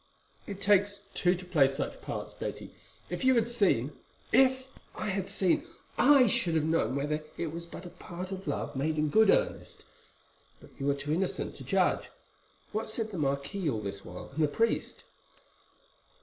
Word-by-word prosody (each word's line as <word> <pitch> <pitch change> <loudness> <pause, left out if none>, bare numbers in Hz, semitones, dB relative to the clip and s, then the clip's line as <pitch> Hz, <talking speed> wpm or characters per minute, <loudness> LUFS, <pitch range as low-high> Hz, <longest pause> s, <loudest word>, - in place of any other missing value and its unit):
"It 200 -1 -6
takes 200 0 +3
two 180 0 +2
to 180 +1 -9
play 155 -6 +4
such 135 +2 -4
parts, - - -5
Betty. - - -6 0.4
If - - -3
you 260 0 +5
had 230 -1 +3
seen——" 180 - +2 0.4
"If 260 +1 +4 0.3
I 215 - -3
had 195 -1 -1
seen, 185 -3 +1 0.3
I 280 -3 +6
should 175 -6 +2
have 160 - +2
known 155 -6 +1
whether 150 +2 -1
it 160 -2 -3
was 170 0 -6
but 175 - -9
a 175 - -8
part 180 +2 -7
or 190 -1 -4
love 145 - -2
made 155 +4 0
in 150 0 +1
good 220 +8 +5
earnest; - - +1 0.7
but - - -16
you 140 +1 0
are 140 - +2
too 145 +2 -3
innocent 185 +3 -1
to - - -9
judge. - - +1 0.6
What 215 +1 -2
said 220 0 -3
the 185 - -4
marquis 140 +6 -1
all 110 -5 -1
this 100 -1 -5
while, 90 +1 -9
and 160 - -1
the - - +4
priest?" 225 +10 -1
175 Hz, 180 wpm, -30 LUFS, 145-205 Hz, 0.7 s, I